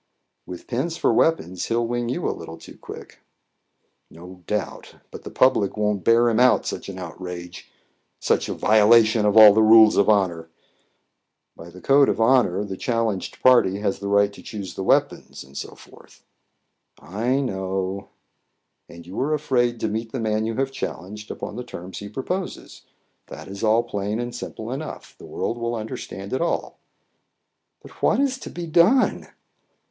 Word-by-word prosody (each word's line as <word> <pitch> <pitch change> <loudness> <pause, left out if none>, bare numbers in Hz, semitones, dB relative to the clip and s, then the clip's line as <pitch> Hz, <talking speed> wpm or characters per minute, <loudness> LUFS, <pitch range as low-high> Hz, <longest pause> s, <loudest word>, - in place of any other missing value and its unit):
"With 90 -1 -9
pens 155 +7 -3
for - - +1
weapons 95 - 0
he 115 - -1
will 120 0 +1
wing 120 0 -2
you 170 +8 -2
a - - -1
little 80 0 -10
too - - -14
quick." - - -12 0.9
"No 90 +2 -13
doubt. 105 -3 -4 0.2
But - - -9
the - - -7
public 110 -6 +2
won't 105 -3 -1
bear 115 +1 +4
him 115 0 +1
out 125 0 +4
such - - -5
an 95 - -8
outrage 90 0 -8 0.5
such - - 0
a - - -3
violation 110 0 +4
of 105 +1 +2
all 105 -2 +10
the 110 - +3
rules 110 0 +7
of 100 - +3
honour." 90 -6 +1 1.1
"By 85 - -12
the 90 +1 -14
code 140 0 +4
of 100 - -1
honour, 115 -5 +3
the 95 -2 -6
challenged 115 -5 -2
party 120 -7 +5
has 100 -2 -1
the 100 - -5
right 100 0 +2
to - - -13
choose 100 -4 -7
the - - -6
weapons, 95 - 0
&c." - - -5 1.3
"I 110 - -1
know." 95 -5 -3 0.8
"And 85 0 -12
you 90 +3 -7
are 150 +4 +1
afraid 120 -5 0
to - - 0
meet 110 +2 -4
the 130 - -3
man 110 -1 -1
you 115 - -3
have 135 +2 -1
challenged 105 -3 -7
upon 105 - -7
the 125 - -5
terms 95 -6 -9
he 100 - -8
proposes. 180 - -5 0.5
That 75 +3 -10
is 100 +2 -8
all 110 +1 +3
plain 105 -1 -3
and 120 0 -4
simple 115 -1 -7
enough. 145 +4 -7
The - - -12
world 120 - -4
will 115 0 -2
understand 100 -2 -7
it 130 - -1
all." 170 - -2 1.0
"But - - -16
what - - +2
is 270 -1 0
to - - -8
be 175 0 -6
done?" 175 - +3
110 Hz, 175 wpm, -23 LUFS, 95-120 Hz, 1.3 s, all